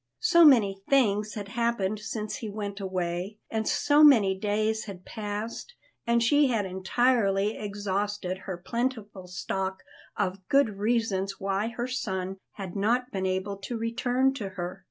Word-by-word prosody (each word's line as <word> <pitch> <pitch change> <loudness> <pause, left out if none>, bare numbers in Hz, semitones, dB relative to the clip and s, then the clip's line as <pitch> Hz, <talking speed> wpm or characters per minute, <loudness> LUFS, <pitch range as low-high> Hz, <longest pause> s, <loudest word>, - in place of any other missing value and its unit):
So 340 -6 +6
many 210 -10 +5
things 215 -6 +2
had 205 -2 -6
happened 230 -3 0
since 215 0 -4
he 220 - -5
went 200 -1 -5
away, 185 +1 -3
and 220 -1 -1
so 290 +1 +4
many 220 -10 +6
days 215 +2 0
had 190 -3 -9
passed, 215 - -5 0.3
and 235 0 +3
she 290 +4 +4
had 225 -5 0
entirely 200 +1 +1
exhausted 205 -2 -3
her 185 - -3
plentiful 215 -2 -3
stock 190 +1 -3 0.3
of 190 -2 0
very 275 +1 +6
good 210 -6 -6
reasons 205 -3 0
why 195 +2 -1
her 235 +1 -3
son 190 -7 -3 0.2
had 190 -3 -7
not 240 +5 +1
been 190 -1 -1
able 190 +2 -2
to 215 +5 -5
return 245 +3 +1
to 215 -8 -5
her. 185 0 -6
205 Hz, 155 wpm, -27 LUFS, 195-235 Hz, 0.3 s, So